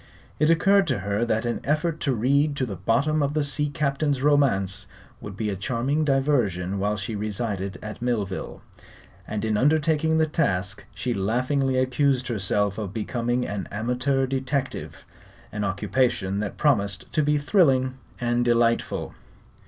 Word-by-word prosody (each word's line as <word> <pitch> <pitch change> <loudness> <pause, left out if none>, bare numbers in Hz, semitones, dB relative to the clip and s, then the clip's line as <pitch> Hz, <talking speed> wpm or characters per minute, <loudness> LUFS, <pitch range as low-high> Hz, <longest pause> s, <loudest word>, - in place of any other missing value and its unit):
It 155 +1 +3
occurred 195 +4 +4
to 100 - -1
her 100 +3 -1
that 110 0 0
an 120 - -2
effort 155 +2 0
to 135 -3 0
read 140 +6 +2
to 135 - -1
the 105 -5 -5
bottom 135 - +1
of 145 +1 0
the 155 - +2
sea 150 +1 +1
captain's 140 -2 -1
romance 105 -10 +2 0.3
would 100 -2 -8
be 105 -1 -1
a - - -2
charming 130 +9 -1
diversion 120 - +1
while 105 +2 0
she 105 +2 -4
resided 100 -2 -3
at 110 +1 -7
Millville, 105 -6 -3 0.6
and 105 0 -3
in 110 -1 +1
undertaking 155 +3 +2
the 160 - +4
task 100 - -1
she 125 - -2
laughingly 130 +6 0
accused 130 0 +1
herself 105 -1 0
of 105 -1 -5
becoming 120 +2 -1
an 100 -2 -4
amateur 125 +5 0
detective 135 +1 -3 0.5
an 105 0 -3
occupation 100 0 0
that 105 -1 -4
promised 100 -9 +1
to 155 - +3
be 150 0 +2
thrilling 140 -5 +3 0.3
and 120 0 +1
delightful. 115 -1 +1
125 Hz, 150 wpm, -25 LUFS, 105-145 Hz, 0.6 s, occurred